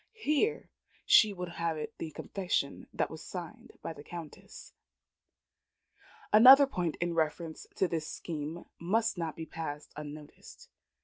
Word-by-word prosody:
Here 425 +3 0 0.3
she 215 - +7
would 180 -2 -5
have 170 -1 -2
it 150 - -5
the 160 - -4
confession 180 -3 -2 0.2
was 160 0 -9
signed 175 -3 -8
by - - -4
the 145 - -12
Countess. 165 -3 -10 1.6
Another 260 +6 +10
point 180 - -2
in 175 0 -2
reference 160 0 -2
to 190 - +2
this 160 -2 -3
scheme 160 +1 -5
must 220 +7 +1
not 165 -4 -3
be 160 - -6
passed 150 -3 -6
unnoticed. 150 0 -10
170 Hz, 130 wpm, -31 LUFS, 155-190 Hz, 1.6 s, Another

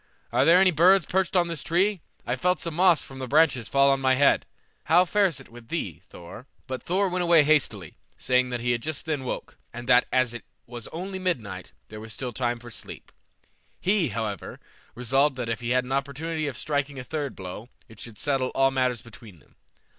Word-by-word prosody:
Are - - +3
there 170 +2 +7
any 190 0 +5
birds 180 +3 +5
perched 190 0 -1
on 175 -1 +3
this 165 -4 -3
tree? 185 +2 +1 0.2
I 120 - -1
felt 180 +5 +1
some 170 0 -4
moss 175 0 +4
from 135 -1 -11
the 130 - -5
branches 140 -5 +3
fall 140 0 +4
on 135 0 0
my 130 0 +3
head. 140 +1 +3 0.4
How 175 +3 +5
fares 195 -3 +1
it 135 - -14
with 120 0 -14
thee, 100 - -4
Thor?" 90 +9 -11 0.2
But 130 -1 -5
Thor 195 +3 0
went 180 0 -1
away 170 -3 +5
hastily, 130 - 0 0.2
saying 125 0 +1
that 120 -1 -3
he 120 +1 0
had 120 -1 -1
just 155 +4 -3
then 155 -4 -2
awoke, 130 - -6
and 120 0 -8
that 125 -1 +5
as 130 -2 +2
it 120 - -8 0.2
was 120 -1 -8
only 190 +3 -6
midnight, 165 - -3 0.2
there 110 - -9
was 110 0 -7
still 125 +3 -5
time 120 0 -1
for 120 0 -12
sleep. - - -8 0.7
He, 190 -3 +2
however, 105 -4 -5 0.4
resolved 135 +4 +1
that 125 -2 -4
if 115 - -2
he 120 - -3
had 125 +1 +2
an 125 - -9
opportunity 150 +3 -2
of 140 - -5
striking 145 -2 -2
a 130 - -6
third 145 -2 -4
blow, 95 +5 -8 0.2
it 110 -2 -16
should 115 -3 -10
settle 135 -1 0
all 135 0 +3
matters 130 -3 0
between 110 -4 -14
them. 75 - -26
135 Hz, 215 wpm, -26 LUFS, 120-165 Hz, 0.7 s, there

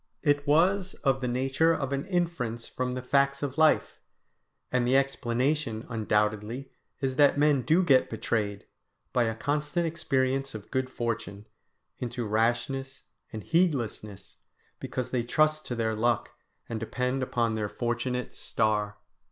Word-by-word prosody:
It 145 -2 +2
was 185 +6 +3
of 135 -2 +2
the 125 - -1
nature 135 +6 +2
of 140 -2 -2
an 140 +5 -2
inference 165 - -1
from 125 0 -3
the 130 - -4
facts 140 +1 +2
of 140 +2 -3
life; 155 -1 +3 0.7
and 125 -1 +1
the 130 +2 +5
explanation 135 -2 0
undoubtedly 110 +3 -1 0.3
is 130 -1 -1
that 145 -1 +5
men 145 -2 +4
do 160 +9 +3
get 135 -7 +4
betrayed, 105 -2 -2 0.5
by 120 -2 +3
a 110 0 -1
constant 150 +7 -1
experience 135 -5 0
of 105 -2 -9
good 130 -1 0
fortune, 115 -4 -4 0.5
into 120 -1 -3
rashness 120 +5 -1 0.3
and 110 - -6
heedlessness, 120 - -1 0.4
because 125 -1 -4
they 125 - +1
trust 155 +5 +1
to 120 - -3
their 110 -1 0
luck 120 +1 +1 0.4
and 115 - -4
depend 125 +4 -2
upon 120 -3 0
their 105 -1 -2
fortunate 120 +2 -2
star. 105 -1 -1
130 Hz, 145 wpm, -28 LUFS, 115-145 Hz, 0.7 s, the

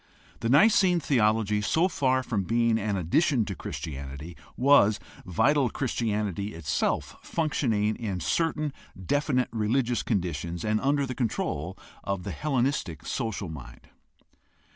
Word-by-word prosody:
The 115 - -1
Nicene 180 - +5
theology, 110 -7 +2
so 160 - +2
far 130 -7 +1
from 110 -5 -1
being 115 +4 +2
an 100 -1 -1
addition 115 - +2
to 100 - -4
Christianity, 70 +1 -6 0.2
was 125 -6 +5 0.3
vital 135 - +3
Christianity 105 - -2
itself 75 -3 -1
functioning 115 -10 0
in 100 -6 -3
certain 155 - 0 0.3
definite 130 - 0
religious 120 +2 0
conditions 85 - -2
and 110 0 +1
under 140 0 +2
the 130 - -4
control 95 - -2 0.3
of 100 -2 -3
the 100 - -4
Hellenistic 130 - -1
social 110 -6 -3
mind. 60 -6 -10
110 Hz, 120 wpm, -27 LUFS, 95-135 Hz, 0.3 s, Nicene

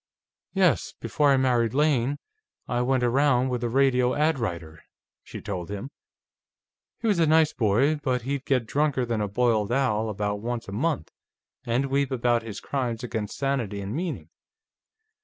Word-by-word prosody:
"Yes. 180 -8 +2
Before 145 +6 +1
I 135 - +5
married 125 -3 +2
Lane, 145 -2 +2 0.5
I 120 0 0
went 130 0 +1
around 130 +1 +3
with 125 -1 -2
a 120 - 0
radio 125 -1 +3
ad 155 -1 +2
writer," 85 -7 -5 0.4
she - - -9
told 90 -5 -5
him. 105 +7 -6 1.1
"He - - -8
was 205 -5 +2
a 165 - +4
nice 155 0 +4
boy, 120 +8 +2
but 130 -4 -1
he'd 140 +1 -3
get 130 -4 +1
drunker 140 0 0
than 115 -2 -1
a 105 - 0
boiled 110 0 +1
owl 110 -4 +1
about 105 0 -2
once 120 +2 -4
a - - -7
month, 135 - -1 0.6
and 120 +4 +1
weep 140 -1 +1
about 120 -2 +1
his 110 -3 -7
crimes 125 -4 -3
against 110 -4 -4
sanity 125 -8 -1
and 100 +1 -5
meaning. 170 +3 -4
125 Hz, 165 wpm, -26 LUFS, 110-140 Hz, 1.1 s, I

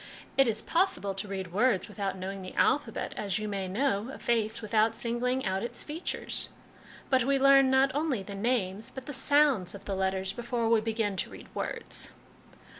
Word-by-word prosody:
" - - -19
It 270 -1 +5
is 220 -1 -1
possible 335 - +1
to 195 +2 -5
read 190 -3 -5
words 210 -2 +2
without 195 -2 -3
knowing 190 +1 -5
the 185 - -8
alphabet, 260 -6 +1
as 200 -2 -1
you 215 0 -3
may 195 -2 -3
know 215 +2 0
a - - -8
face 225 -1 0
without 220 +1 +2
singling 250 +3 -1
out 190 0 0
its 235 - -5
features; 310 +3 -2 0.6
but 260 -2 +4
we 275 +2 +2
learn 275 0 +6
not 265 +1 +4
only 285 -8 0
the 200 - -7
names 205 -1 -1
but 265 -1 -9
the 290 - -6
sounds 270 -9 +3
of 200 - -11
the 200 - -2
letters 190 0 0
before 235 -1 -2
we 225 -1 +4
begin 220 -2 -1
to - - -2
read - - -12
words." - - -4
225 Hz, 190 wpm, -29 LUFS, 195-260 Hz, 0.6 s, learn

